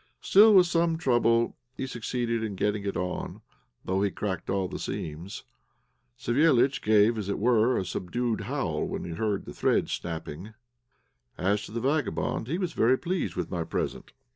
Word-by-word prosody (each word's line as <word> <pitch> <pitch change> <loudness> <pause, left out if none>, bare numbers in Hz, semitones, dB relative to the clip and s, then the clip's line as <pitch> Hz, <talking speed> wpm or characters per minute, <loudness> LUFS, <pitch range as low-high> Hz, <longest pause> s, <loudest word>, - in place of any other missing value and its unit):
Still, 210 +2 +6
with 185 -2 +8
some 170 -1 +1
trouble, 120 -5 +2 0.2
he - - -2
succeeded 120 -2 -2
in 110 -3 -3
getting 105 +1 -1
it 100 - -2
on, 90 +1 -4 0.4
though 95 +1 0
he 100 - +2
cracked 95 -2 -4
all 95 -1 0
the - - -6
seams. 80 +6 -5 0.7
Savéliitch 135 0 +3
gave, 110 +1 +4
as 100 -2 -4
it 100 - -1
were, 120 +2 +3
a 95 - -1
subdued 115 +6 -2
howl - - -2
when - - -4
he 85 - -6
heard 100 +3 -2
the - - -8
threads - - +1
snapping. 85 +5 -6 0.8
As 100 +3 0
to - - -12
the 115 +1 -3
vagabond, 140 -4 -1
he 160 +6 -1
was 180 -3 -2
very 125 +4 +3
pleased 175 - -2
with 90 -2 -3
my 85 -3 -1
present. 80 - -4
110 Hz, 170 wpm, -27 LUFS, 95-130 Hz, 0.8 s, with